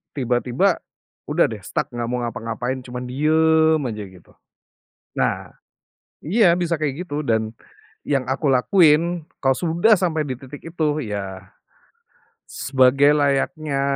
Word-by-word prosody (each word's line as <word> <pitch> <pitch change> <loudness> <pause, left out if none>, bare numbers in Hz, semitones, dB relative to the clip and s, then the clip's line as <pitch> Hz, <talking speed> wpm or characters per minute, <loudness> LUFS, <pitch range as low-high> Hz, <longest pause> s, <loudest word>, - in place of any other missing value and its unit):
Tiba-tiba, 125 +7 +1 0.5
udah - - +3
deh - - -8
stuck - - -2
nggak 120 -1 -4
mau 125 - -1
ngapa-ngapain, 120 +3 -4
cuman 125 0 -7
diem 160 +3 +3
aja 105 -2 -5
gitu. 90 -2 -18 0.9
Nah, - - -1 0.7
iya 180 0 +4
bisa 170 -2 -1
kayak 155 +4 -3
gitu, 145 -1 -4
dan, 110 -2 0 0.6
yang 135 -3 +1
aku 140 +3 -1
lakuin, 160 +4 +3 0.2
kalau 135 -1 +3
sudah 175 +5 +3
sampai 165 -4 0
di 130 -4 -5
titik 135 +2 -11
itu, 155 -3 -2
ya, 95 -3 -6 0.9
sebagai 135 +2 +3
layaknya, 140 0 0
145 Hz, 125 wpm, -21 LUFS, 125-160 Hz, 0.9 s, iya